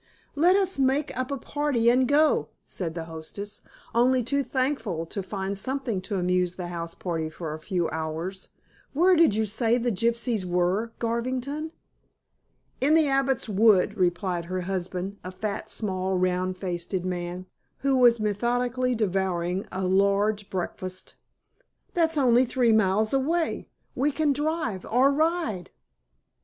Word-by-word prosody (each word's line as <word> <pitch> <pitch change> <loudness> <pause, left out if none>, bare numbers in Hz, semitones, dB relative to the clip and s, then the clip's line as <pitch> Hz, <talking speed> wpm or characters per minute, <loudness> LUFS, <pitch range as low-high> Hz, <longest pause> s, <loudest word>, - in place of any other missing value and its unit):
"Let 345 +6 +4
us 385 -6 +1
make 270 +3 +1
up 255 0 -2
a 280 - -2
party 285 -4 -1
and 255 +1 +3
go," 300 +3 +3 0.2
said 170 -3 -5
the 165 - -3
hostess, 165 +6 -8 0.3
only 250 +2 +3
too 280 +4 +1
thankful 250 - -1
to 200 +4 -5
find 195 0 -4
something 250 -1 -2
to 200 +2 -4
amuse 180 -1 +1
the 175 -2 -5
house 170 -1 -5
party 165 -3 -3
for 155 -1 -6
a 155 - -6
few 175 +1 -1
hours. 160 +4 -4 0.4
"Where 360 +6 +5
did 325 -11 +5
you 220 0 +1
say 225 +3 +1
the 245 0 0
gypsies 230 0 0
were, 180 +5 0
Garvington?" 255 +6 -2 1.1
"In 290 +4 +4
the 320 -2 +4
Abbot's 270 -2 +1
Wood," 210 -2 +4
replied 175 -1 0
her 185 +1 -3
husband, 185 +1 -3
a 185 - -5
fat, 200 +2 -4
small 190 -3 -1
round 185 0 0
faced 175 -1 -4
man, 180 0 -4 0.4
who 275 -1 +2
was 240 -2 +5
methodically 245 +4 0
devouring 190 -3 -1
a 190 0 -2
large 200 +2 +2
breakfast. 185 0 -5 0.8
"That's 325 -2 +2
only 250 -3 +5
three 245 -1 +2
miles 215 +1 +2
away. 320 +5 0 0.3
We 280 +4 +1
can 290 0 +1
drive 300 - -2
or 260 +4 +3
ride." 310 - 0
215 Hz, 145 wpm, -26 LUFS, 185-260 Hz, 1.1 s, Where